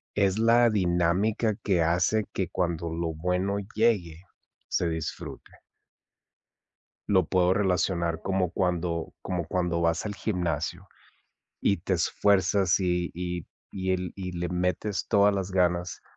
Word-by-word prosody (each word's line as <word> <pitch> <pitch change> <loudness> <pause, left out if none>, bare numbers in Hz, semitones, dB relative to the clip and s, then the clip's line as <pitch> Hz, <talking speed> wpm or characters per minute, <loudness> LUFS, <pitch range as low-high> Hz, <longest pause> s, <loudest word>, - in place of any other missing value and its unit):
es 100 -1 +2
la 115 +1 +5
dinámica 100 +3 +1
que 95 -4 +2
hace 90 +6 +2
que 95 - -1
cuando 85 -2 -2
lo 85 0 -2
bueno 90 +5 -1 0.2
llegue, 95 -7 +1 0.5
se 85 - +1
disfrute. 80 -2 -6 1.6
Lo 95 -3 +4
puedo 90 -1 +3
relacionar 90 -4 0
como 95 -3 0
cuando 90 -3 -1
como 90 -3 -3
cuando 90 -2 0
vas 85 +2 +1
al 105 - -3
gimnasio 85 -8 -2 0.8
y 100 - +2
te 95 +3 -1
esfuerzas, 95 +1 +2
y 90 -2 0
y 90 -1 -4 0.2
y 95 -1 -2
el 90 -2 -2
y 90 -2 -5
le 90 0 -3
metes 90 +3 -1
todas 100 0 +4
las 95 -1 -2
ganas, 90 -1 0
90 Hz, 130 wpm, -27 LUFS, 85-100 Hz, 1.6 s, la